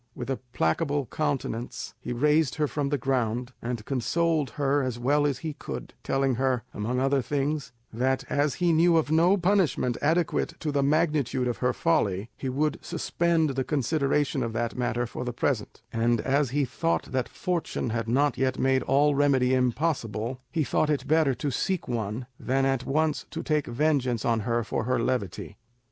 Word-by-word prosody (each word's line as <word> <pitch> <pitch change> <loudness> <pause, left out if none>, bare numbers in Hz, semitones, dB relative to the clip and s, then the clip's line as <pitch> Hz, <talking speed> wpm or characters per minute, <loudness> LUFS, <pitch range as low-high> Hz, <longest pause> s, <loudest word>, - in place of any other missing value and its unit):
With 125 +2 -4
a 135 - -1
placable 140 - 0
countenance 135 -5 -3
he - - -6
raised 150 +3 +2
her 150 -1 +1
from 145 -1 -2
the 145 - +1
ground, 125 -1 -1
and 115 -2 -4
consoled 155 +3 0
her 140 0 +2
as 130 -3 -2
well 145 +4 +2
as 140 -4 -1
he 155 - -2
could, - - -7
telling 135 -1 +1
her, 130 -3 +1
among 120 +5 -2
other 135 +1 +2
things, 145 +2 -2 0.2
that 130 +3 0
as 145 0 +1
he 175 -2 +2
knew 165 +1 +5
of 155 -2 +1
no 170 +5 +4
punishment 180 -10 +1
adequate 165 +1 0
to 155 - -1
the 140 -1 +1
magnitude 145 -3 +1
of 120 - -2
her 125 0 +1
folly, 105 - 0
he 135 - -4
would 145 +3 0
suspend 165 -3 0
the 135 0 -1
consideration 145 +1 0
of 115 - -2
that 115 0 -2
matter 120 -1 -1
for 120 - -6
the 125 -1 -3
present; 115 -3 -2
and 115 0 +2
as 140 0 +1
he 140 +2 +1
thought 165 +6 -1
that 130 -3 -1
fortune 175 -9 -2
had 115 0 -2
not 130 +2 +2
yet 130 -1 +1
made 130 0 +2
all 145 +2 +3
remedy 135 -3 +3
impossible, 125 -2 -1
he 160 -3 +1
thought 150 +2 +1
it 140 -3 0
bettor 155 -4 +3
to 145 +2 -2
seek 185 +7 -1
one 115 0 -3
than 135 +1 +1
at 135 -1 0
once 155 +1 0
to 165 - -5
take 150 -2 0
vengeance 130 -2 +1
on 115 -1 +2
her 115 +2 0
for 110 - -2
her 130 +1 +1
levity. 120 -5 -2
135 Hz, 185 wpm, -27 LUFS, 125-150 Hz, 0.2 s, knew